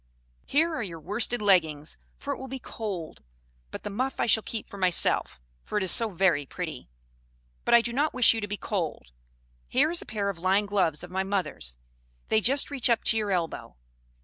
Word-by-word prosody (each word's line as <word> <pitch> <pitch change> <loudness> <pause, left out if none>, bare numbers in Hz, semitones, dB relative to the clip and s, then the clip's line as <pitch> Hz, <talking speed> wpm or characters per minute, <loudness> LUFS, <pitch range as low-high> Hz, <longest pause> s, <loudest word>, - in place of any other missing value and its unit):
"Here 320 +4 +2
are 310 - -2
your 170 -6 -6
worsted 220 +6 0
leggins, 160 -7 +2 0.2
for 280 - -4
it - - -8
will 265 - -7
be 265 +1 -5
cold; 200 -9 -6 0.5
but - - -8
the 205 - -5
muff 255 +6 -2
I - - +2
shall 220 -1 +5
keep 220 0 -5
for 200 - -11
myself, 180 - +3 0.2
for - - -3
it 205 - +1
is 185 - +2
so 230 -1 +2
very 175 -6 +2
pretty. 135 - -7 0.8
But - - +5
I 235 - +7
do 235 0 -3
not 295 +4 +1
wish 250 -3 +5
you 225 - -3
to 205 - -3
be 205 0 -4
cold. 165 - -4 0.6
Here 290 +5 +2
is 345 - 0
a - - -11
pair 205 -2 -2
of 190 -4 -5
lined 195 +3 +2
gloves 175 -6 +1
of 180 - -9
my 190 +1 0
mother's; 190 - -2 0.5
they 220 - +3
just 275 +6 +2
reach 260 -4 +2
up 235 - +2
to 225 - +3
your 210 -2 -1
elbow. 175 -4 -2
205 Hz, 210 wpm, -27 LUFS, 180-235 Hz, 0.8 s, I